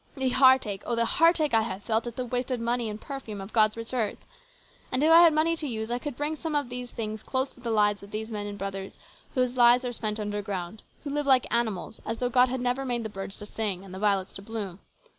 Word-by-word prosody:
" - - -32
The 265 -1 +1
heartache, 260 -6 +4
oh, 240 - +1
the 230 0 +2
heartache 330 -1 +3
I 225 - +5
have 200 -3 -4
felt 225 +2 0
at 235 - -6
the 255 - -3
wasted 250 +1 -2
music 235 0 -1
and 210 0 -6
perfume 250 -7 -7
of 195 +2 -9
God's 215 -1 +4
rich 230 +2 -6
earth! 230 -4 -1 0.7
And 255 - +1
if 315 - +5
I 335 +1 +9
had 340 -1 +8
money 315 +2 +2
to 315 -2 0
use, 220 -2 -3
I 245 - 0
could 285 -2 -6
bring 295 +2 -1
some 315 0 -4
of 285 -4 0
these 250 0 -5
things 215 -2 -5
close 260 +3 -1
to - - -21
the 240 -1 -5
lives 210 -2 +2
of 200 - -12
these 220 +2 -5
men 205 -1 -3
and 205 0 -6
brothers 195 -1 -5 0.4
whose 255 -1 +1
lives 245 +1 +6
are 245 - -2
spent 215 -2 -2
underground, 205 -2 -4 0.2
who 285 - -4
live 290 0 -1
like 260 -2 +5
animals, 220 -3 -1
as 225 - -3
though 245 0 0
God 250 +1 +4
had 255 0 -2
never 250 +2 0
made 245 -3 -1
the 220 - -4
birds 195 -1 -6
to 210 - -9
sing 205 -3 -2
and 185 - -11
the 190 - -6
violets 200 -2 +1
to - - -7
bloom. 205 -4 -6
235 Hz, 260 wpm, -27 LUFS, 210-260 Hz, 0.7 s, I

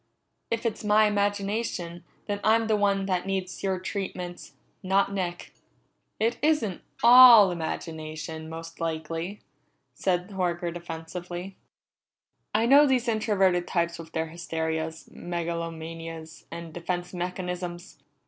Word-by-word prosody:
If 230 +1 -2
it's 225 -1 -2
my 210 +1 +5
imagination, 205 -4 -1 0.2
then 205 -1 -2
I'm 225 +1 +4
the 220 -1 +2
one 200 -1 +2
that 185 -1 -1
needs 190 -2 -3
your 190 -1 0
treatments, 180 -2 -5 0.3
not 195 +1 +2
Nick." 175 -3 -4 0.7
"It 230 +2 +1
isn't 290 - +1 0.2
all 235 -5 +10
imagination, 160 -1 -5
most 165 0 -8
likely," 165 +4 -3 0.5
said 180 +1 -1
Horker 175 -2 -1
defensively. 175 +2 -7 1.0
"I 220 +2 +2
know 285 +4 +7
these 255 -2 +1
introverted 195 -5 +2
types 170 -1 -1
with 165 -1 -9
their 160 0 -1
hysterias, 160 -1 -3
megalomanias, 165 -1 -5
and 170 -1 -8
defense 175 +1 -4
mechanisms! 180 0 -5
180 Hz, 115 wpm, -27 LUFS, 165-205 Hz, 1.0 s, all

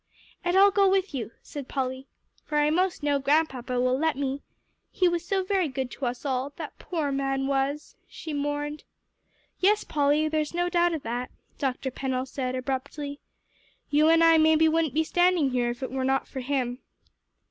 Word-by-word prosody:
"And 350 +1 +1
I'll 400 +1 +7
go 395 -1 +4
with 385 -2 +1
you," 240 -6 -3
said 285 -3 -7
Polly, 260 0 -3 0.4
"for 300 - -2
I 295 0 +3
most 360 -1 0
know 290 -1 +2
Grandpapa 270 -4 +1
will 255 +1 +2
let 320 -3 +1
me. 275 0 -2 0.5
He 365 - +2
was 345 -1 0
so 385 +2 0
very 375 -2 +1
good 265 -2 -4
to 265 - -3
us 245 +3 -5
all 265 0 -1
that 315 -3 -8
poor 315 -5 -2
man 270 0 -1
was," 275 +2 -1
she 315 - -7
mourned. 290 +1 -3 0.8
"Yes, 415 +3 +3
Polly, 295 +1 +2
there's 310 +1 -1
no 350 0 +1
doubt 345 -1 +2
of 305 - -6
that," 245 +2 -3 0.3
Dr. 265 -1 -2
Pennell 260 0 -2
said 255 -1 -3
abruptly. 275 +3 -4 0.7
"You 305 +2 +4
and 330 0 +5
I 330 -1 +6
maybe 315 0 +5
wouldn't 315 -3 +1
be 320 - +3
standing 350 -4 +2
here 245 -1 +1
if 240 +2 -5
it - - -4
were 265 0 -2
not 270 +1 +1
for 265 - -6
him." 255 -2 -2
290 Hz, 185 wpm, -26 LUFS, 265-325 Hz, 0.8 s, I'll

